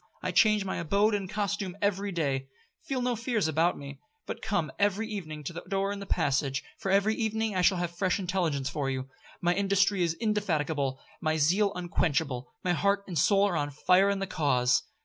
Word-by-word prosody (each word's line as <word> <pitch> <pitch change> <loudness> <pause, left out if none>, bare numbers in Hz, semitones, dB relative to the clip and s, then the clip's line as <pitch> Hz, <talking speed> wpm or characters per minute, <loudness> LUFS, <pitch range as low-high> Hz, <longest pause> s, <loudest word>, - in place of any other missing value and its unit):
I 185 - -1
change 215 +1 +4
my 190 - -2
abode 200 +6 +2
and 195 -3 -2
costume 200 -2 -2
every 200 0 0
day. 140 -6 -1 0.4
Feel 260 -2 -1
no 245 -1 +1
fears 230 -5 0
for 160 +3 +2
me, 140 -1 -9 0.3
but - - -6
come 175 -7 -1
every 205 +2 +1
evening 155 -8 -6
to 160 - -5
the 170 - -6
door 195 0 0
in 200 - -4
the 200 - -8
passage, 135 0 0 0.2
for 195 - -3
every 200 +3 +3
evening 220 -1 -1
I 180 - +2
shall 185 +1 +4
have 175 -1 -3
fresh 185 +2 +1
intelligence 175 -8 -1
for 140 -1 -2
you. 130 0 -3 0.3
My 175 0 +3
industry 200 0 +2
is 165 -1 +1
indefatigable, 160 - -1 0.2
my 155 -1 +1
zeal 185 +7 +3
unquenchable, 145 -7 -1
my 180 - +2
heart 200 +3 +1
and 180 - -7
soul 195 +6 +4
are 185 - -1
on 145 -2 0
fire 180 +7 +3
in 200 - +1
the 195 - -2
cause. 130 -8 +2
185 Hz, 200 wpm, -29 LUFS, 155-200 Hz, 0.4 s, change